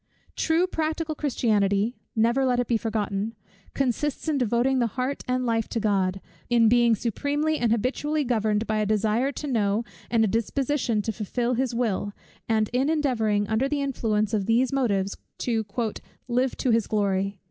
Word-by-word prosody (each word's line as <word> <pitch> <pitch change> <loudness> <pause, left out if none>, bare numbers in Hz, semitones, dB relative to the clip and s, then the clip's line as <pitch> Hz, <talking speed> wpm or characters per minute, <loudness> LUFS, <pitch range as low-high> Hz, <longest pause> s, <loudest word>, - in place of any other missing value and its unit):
True 325 +2 +2
practical 320 -2 -2
Christianity 220 -6 +1 0.2
(never 235 +4 +3
let 250 -2 +2
it 245 - +1
be 235 - +1
forgotten) 215 -1 -2 0.4
consists 275 +3 -1
in 300 -3 +1
devoting 250 +2 +2
the 240 - +2
heart 255 +2 -1
and 255 0 0
life 225 -2 0
to 230 - -1
God; 195 -3 0 0.3
in 235 -2 +5
being 235 0 +4
supremely 290 +8 -1
and 235 -2 +1
habitually 275 +7 0
governed 220 -3 0
by 215 -1 0
a 210 - +1
desire 215 +5 +1
to - - -6
know, 220 -5 +1 0.3
and 230 -2 +3
a - - +3
disposition 235 +1 0
to 220 - -1
fulfil 235 +4 -2
his 250 -1 -1
will, 205 -4 -1 0.4
and 220 -1 +2
in 260 +4 +2
endeavouring 225 -10 +1
under 220 +6 +1
the 290 -1 0
influence 220 -5 0
of 205 -3 0
these 245 +4 +2
motives 200 -7 0 0.2
to 225 -3 -1 0.6
"live 250 +1 0
to 255 - +1
his 225 -2 +2
glory." 200 -2 0
235 Hz, 170 wpm, -25 LUFS, 215-265 Hz, 0.6 s, in